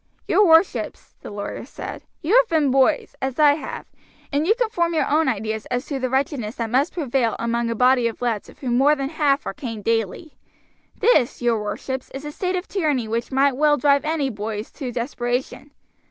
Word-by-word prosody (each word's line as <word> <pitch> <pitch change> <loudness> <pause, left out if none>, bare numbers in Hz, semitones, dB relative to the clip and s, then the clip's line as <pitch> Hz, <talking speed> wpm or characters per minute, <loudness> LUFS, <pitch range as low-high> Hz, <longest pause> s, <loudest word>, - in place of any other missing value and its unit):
"Your 415 - +4
worships," 325 +3 +2
the - - -8
lawyer 205 0 -5
said, - - -8 0.2
"you 355 +9 +2
have - - +4
been 305 -5 +2
boys, 270 +3 +2
as 265 -1 -2
I 295 -2 +6
have, 300 - -6 0.5
and 295 +3 +1
you 435 - +4
can 475 -2 0
form 340 -4 0
your 315 - +2
own 310 +1 +2
ideas 220 -2 -2
as 245 +2 -2
to 280 -3 -4
the 255 0 -1
wretchedness 265 -4 -1
that 230 -2 -3
must 275 +6 +2
prevail 265 - 0
among 235 0 -1
a 230 - -1
body 250 0 +4
of 230 - -5
lads 235 -4 -2
of - - -16
whom 245 -2 0
more 290 +3 +5
than 275 -1 -3
half 290 -3 +1
are - - -3
caned 230 -7 -6
daily. 225 - -2 0.6
This, 300 - +3
your 230 -3 +2
worships, 260 +5 -4
is 275 +2 -6
a 295 - -5
state 365 +3 -2
of 360 +1 -3
tyranny 295 - 0
which 230 +2 -3
might 270 0 +3
well 295 +1 +3
drive 280 -1 +3
any 305 -4 -1
boys 210 0 -5
to 265 -4 -6
desperation. 245 +3 -3
270 Hz, 205 wpm, -22 LUFS, 235-300 Hz, 0.6 s, I